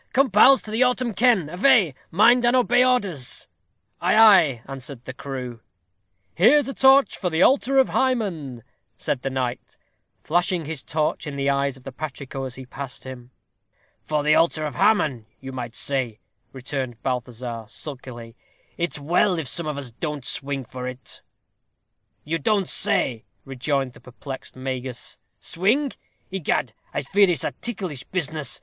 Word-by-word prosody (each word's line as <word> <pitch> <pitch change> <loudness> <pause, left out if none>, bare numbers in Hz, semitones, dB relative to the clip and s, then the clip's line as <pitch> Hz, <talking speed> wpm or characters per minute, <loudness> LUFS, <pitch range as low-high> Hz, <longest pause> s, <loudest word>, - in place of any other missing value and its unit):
Come, 270 -2 +3
pals, 260 +7 +6
to 215 - -8
the 225 +3 0
autem 250 -2 +2
ken. 225 -10 +3
Avay. 180 - +4 0.2
Mind 235 +7 +5
and 240 +1 +4
obey 250 0 +4
orders." 200 - -1 0.5
"Ay, 180 +3 +2
ay," 180 - +6
answered 135 -2 -8
the 130 - -6
crew. 130 -3 -6 0.7
"Here's 265 - +5
a 275 - -3
torch 270 +1 +5
for 180 - -1
the 160 +1 +2
altar 270 0 +3
of 265 - +5
Hymen," 180 - -1 0.3
said 130 - -2
the 135 - -2
knight, 130 -2 -4 0.5
flashing 175 0 +1
his 155 -3 -5
torch 155 0 -2
in 145 - -5
the 140 0 +1
eyes 140 -1 0
of 130 - -17
the 135 - -7
patrico 135 -1 -6
as 130 -1 -7
he 130 - -9
passed 135 0 -7
him. 125 -2 -9 0.7
"For 150 -1 -1
the 150 +1 +4
halter 160 -1 +2
of 150 - -4
Haman, 135 - +2
you 135 0 -8
might 120 -2 -6
say," 130 -6 -1 0.3
returned 130 -2 -5
Balthazar, 125 -2 -4
sulkily. 120 -3 -9 0.4
"It's 170 -2 -2
well 175 +5 +2
if 160 -4 -3
some 170 +6 -2
of 150 -2 -3
us 135 -4 -7
don't 150 +2 -5
swing 135 -2 -3
for 125 +2 -7
it." 130 0 -8 1.0
"You 165 +2 -2
don't 200 +3 +1
say," 115 -5 +1 0.2
rejoined 135 0 -2
the 115 - -16
perplexed 130 +2 -9
Magus, 130 -1 -5 0.2
"swing! 240 - 0 0.4
Egad 155 - -1 0.2
I - - -3
fear 195 +7 +4
it's 170 -7 +1
a - - -1
ticklish 185 - -5
business. 155 -6 -4
145 Hz, 160 wpm, -23 LUFS, 130-195 Hz, 1.0 s, pals